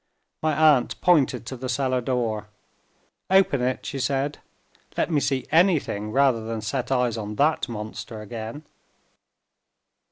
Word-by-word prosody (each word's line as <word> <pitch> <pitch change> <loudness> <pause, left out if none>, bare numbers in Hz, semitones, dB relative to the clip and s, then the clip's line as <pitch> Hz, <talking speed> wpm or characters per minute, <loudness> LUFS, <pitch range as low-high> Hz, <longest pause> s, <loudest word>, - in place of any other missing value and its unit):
My 155 -1 +1
aunt 150 -4 +4
pointed 140 -9 +3
to 130 - -6
the 130 +1 -6
cell 130 0 0
door. 115 -4 -2 0.8
"Open 190 -8 +4
it," 125 +1 -1
she 135 - -4
said, 135 +3 -1 0.6
"Let - - 0
me 150 - +3
see 135 -2 -1
anything, 155 - +2
rather 130 -3 +3
than 110 0 -4
set 125 +4 -3
eyes 125 -3 +1
on 105 0 -5
that 150 +4 +1
monster 110 0 -6
again!" 110 +6 -7
130 Hz, 135 wpm, -24 LUFS, 115-145 Hz, 0.8 s, aunt